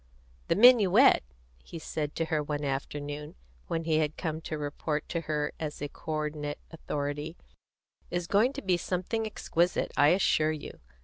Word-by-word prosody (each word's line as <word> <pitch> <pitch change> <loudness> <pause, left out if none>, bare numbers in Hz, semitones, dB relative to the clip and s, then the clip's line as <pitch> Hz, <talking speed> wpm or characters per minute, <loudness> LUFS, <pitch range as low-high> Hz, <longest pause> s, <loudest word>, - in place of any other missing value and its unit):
"The - - +2
minuet," 235 0 +7 0.4
he 170 - -9
said 150 -2 -4
to 165 - 0
her 155 -1 0
one 145 0 -3
afternoon, 145 +2 -4 0.3
when 165 0 -2
he 160 -1 +2
had 155 -1 -1
come 160 -2 -3
to 155 - -4
report 150 +1 -3
to 170 - -1
her 150 -2 -2
as 150 -2 -4
a 145 - -4
co 160 - -6
ordinate 150 -1 -3
authority, 150 0 -4 0.7
"is 175 0 -2
going 210 +8 +3
to 280 - -6
be 185 -2 +2
something 185 +6 -2
exquisite, 175 -4 0
I 145 - +5
assure 155 -3 +3
you. 150 - -8
155 Hz, 165 wpm, -29 LUFS, 150-175 Hz, 0.7 s, minuet